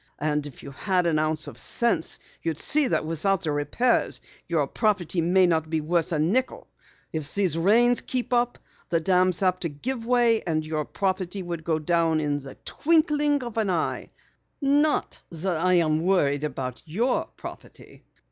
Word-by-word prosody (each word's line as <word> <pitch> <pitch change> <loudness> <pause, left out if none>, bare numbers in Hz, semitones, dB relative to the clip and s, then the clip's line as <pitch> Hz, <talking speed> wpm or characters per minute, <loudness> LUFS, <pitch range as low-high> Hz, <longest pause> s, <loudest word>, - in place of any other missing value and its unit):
"And 150 0 -1
if 140 - -13
you 140 - -8
had 180 +6 0
an 160 -2 +2
ounce 155 +1 0
of - - -7
sense, 235 -8 +1 0.2
you'd 165 -2 -2
see 295 - +2
that - - 0
without 175 +5 0
the 155 - 0
repairs 145 - +1 0.3
your - - +1
property 190 -6 0
may 180 +3 +4
not 160 -2 +1
be 160 0 0
worth 165 +2 0
a 160 - +1
nickel! 200 +13 0 0.5
If 155 -2 -2
these 190 -6 +1
rains 230 +8 +4
keep 250 -1 -3
up, 245 0 +1 0.3
the 165 - +2
dam's 185 +2 +2
apt 185 -1 +1
to 170 - -1
give 230 - -4
way, 240 -2 +3
and 155 -3 -2
your 155 -1 -2
property 190 +1 -2
would 170 -2 -5
go 160 0 0
in 155 -2 +1
the 135 -1 -11
twinkling 295 -3 +2
of 235 -2 -7
an 215 -3 0
eye. 170 -3 -1 0.5
Not 290 +2 +1
that 170 +1 -2
I'm 165 -3 +2
worried 150 -6 +2
about 130 -3 -5
your 230 +11 0
property. - - -11
175 Hz, 165 wpm, -25 LUFS, 155-225 Hz, 0.5 s, may